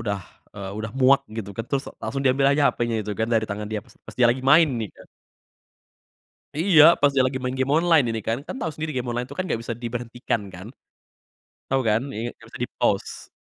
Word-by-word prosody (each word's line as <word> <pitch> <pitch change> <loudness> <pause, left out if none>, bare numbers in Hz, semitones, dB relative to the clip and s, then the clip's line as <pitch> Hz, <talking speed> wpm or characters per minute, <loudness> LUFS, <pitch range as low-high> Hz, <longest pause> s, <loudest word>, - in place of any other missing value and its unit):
udah, 100 -3 -2 0.4
eee, 95 -1 -6
udah 110 0 -4
muak 135 +1 +5 0.2
gitu 105 -3 -5
kan 115 - -3
terus 140 -1 -1 0.2
langsung 135 - -3
diambil 135 +1 +3
aja 145 0 +4
HP-nya 120 -1 -1
itu 105 - -3
kan 110 +1 0
dari 115 -2 +2
tangan 105 +1 -4
dia 110 - -2
pas - - -21
pas - - -10
dia 120 - +6
lagi 125 +2 -1
main 155 +4 +6
nih 110 - -3
kan. - - -15 1.5
Iya, 165 -3 +6 0.2
pas 145 0 +4
dia 130 - +4
lagi 130 0 -3
main 130 0 -3
game 130 +1 0
online 165 -4 +4
ini 115 - -2
kan, 115 - +1
kan - - -5
tau 175 - -2
sendiri 155 0 -4
game 125 -1 -2
online 120 +1 -2
tuh 140 - -9
kan 185 - -1
gak 115 - -1
bisa - - -4
diberhentikan 120 -1 -3
kan, 90 +4 -9 1.0
tau 135 0 +2
kan? 110 +2 +2
Iya, 115 +3 -3
gak - - -17
bisa - - -11
di-pause. - - -2
125 Hz, 220 wpm, -24 LUFS, 115-140 Hz, 1.5 s, dia